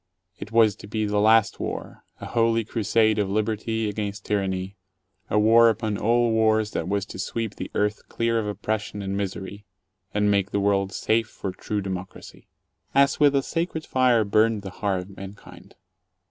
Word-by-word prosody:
It - - -8
was 115 -3 +4
to - - -11
be 110 +1 -1
the 105 0 0
last 110 0 +4
war, - - -6 0.2
a - - -7
holy 115 -1 +1
crusade 110 0 +1
of 100 -2 0
liberty 110 +2 -1
against 105 0 -4
tyranny, 95 -1 -2 0.5
a - - +1
war 115 +2 +6
upon 110 -2 -2
all 120 +1 +2
wars 110 -1 +2
that 80 - -3
was 100 0 -1
to 95 - -10
sweep 110 +2 -3
the - - -5
earth 105 0 -1
clear 115 0 0
of 105 - -3
oppression 105 0 -3
and 95 0 -3
misery, 100 0 -5 0.5
and 105 0 +2
make 100 -1 +1
the 100 - -1
world 100 -1 +1
safe 110 +2 0
for 100 -3 -6
true 105 +3 -4
democracy. 95 -1 -7 0.5
As 140 0 +4
with 145 -2 +5
a 135 - +2
sacred 165 0 -3
fire 125 -3 +3
burned 110 +1 +2
the 95 - -6
heart 95 -2 -1
of 95 +1 -14
mankind. 100 +1 -12
105 Hz, 175 wpm, -24 LUFS, 100-115 Hz, 0.5 s, war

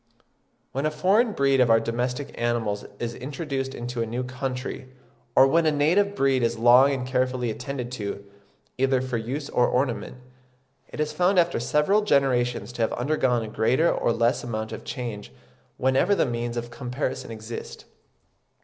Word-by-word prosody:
When 140 +3 -1
a - - +1
foreign 195 +9 +2
breed 135 -3 +2
of 125 - +4
our 115 0 +6
domestic 125 +4 -3
animals 115 -4 -1
is 120 +1 -4
introduced 135 0 -4
into 120 0 -4
a 115 - -1
new 120 +3 -3
country, 130 0 -5 0.5
or 135 - +8
when 160 +4 +3
a - - +4
native 175 +8 +2
breed 135 -5 +2
is 115 0 0
long 125 +4 +6
and 130 -2 -2
carefully 130 -2 0
attended 125 +1 -5
to, 100 -4 -5 0.5
either 135 0 +3
for 130 -1 -2
use 130 +6 -4
or 125 - +2
ornament, 125 -1 -1 0.7
it - - -9
is 150 0 -1
found 180 +4 +2
after 175 -5 +3
several 150 - +2
generations 125 - +1
to 120 - -5
have 110 - +1
undergone 125 -3 +1
a - - -5
greater 115 +9 +2
or - - 0
less 115 +1 +1
amount 110 -2 -4
of - - -7
change 120 -6 -6 0.5
whenever 130 +10 +2
the - - +2
means 120 0 -3
of 120 0 -4
comparison 125 +1 -4
exist. 115 +1 -8
125 Hz, 165 wpm, -25 LUFS, 120-140 Hz, 0.7 s, or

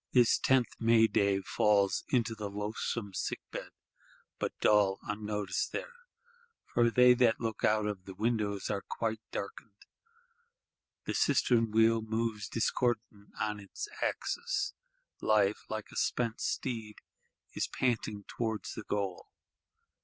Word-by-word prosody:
This 120 -2 +5
tenth 130 -2 +3
May 115 0 +5
day 100 -3 +2
falls 100 +1 +2
into 120 -3 +1
the 105 -2 -5
loathsome 105 0 -3
sick - - -2
bed; - - -6 0.7
but - - -3
dull, 100 -2 +4
unnoticed 105 -1 -2
there: 485 - -4 0.7
for 120 -1 +2
they 125 +1 +7
that 120 -2 +3
look 115 -2 -3
out 110 0 +3
of 100 -3 -4
the 95 - -9
windows 105 -2 -1
are 100 - -1
quite 110 +1 -3
darkened; 100 +1 -7 1.2
the - - -2
cistern 115 -2 +3
wheel 115 +1 +4
moves 110 -1 -2
discordant 115 -3 -1
on 105 -1 -1
its 100 - -7
axis; 405 -4 -1 0.5
Life, 105 -1 +2
like 110 -1 -5
a - - -12
spent 115 -2 0
steed, 110 -5 -2 0.6
is - - -1
panting 110 -5 -1
towards 110 -2 -3
the - - -6
goal. 100 -3 -3
110 Hz, 130 wpm, -32 LUFS, 105-115 Hz, 1.2 s, they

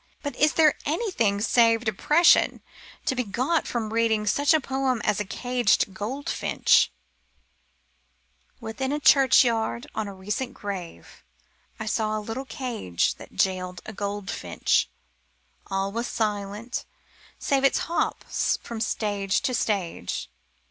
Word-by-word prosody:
But 285 - -4
is 300 +2 +4
there 310 -2 +5
anything 285 - 0
save 230 +1 +3
depression 300 - +4 0.4
to - - +1
be 250 -1 -1
got 255 +10 0
from 225 -3 -3
reading 225 -2 +2
such 285 +8 +2
a 315 - +5
poem 265 -3 -1
as 210 - +1
A 210 - -2
Caged 245 -2 +1
Goldfinch: 245 +9 +1 1.7
Within 245 +3 -4
a 295 - -1
churchyard, 240 - +4
on 220 - -3
a 200 - -7
recent 210 +7 -4
grave, 190 -4 -7 0.6
I 220 - -4
saw 215 0 0
a - - -2
little 225 +5 -5
cage 235 - -2
That - - -13
jailed 180 -1 -1
a 220 - -7
goldfinch. 200 0 -1 0.8
All 195 0 -1
was 235 +3 -3
silence, 210 +2 -3 0.5
save 275 -1 0
Its 275 - +4
hops 340 - -1
from 230 -2 -6
stage 205 -3 0
to 255 - -1
stage. 190 - -2
225 Hz, 130 wpm, -25 LUFS, 205-265 Hz, 1.7 s, there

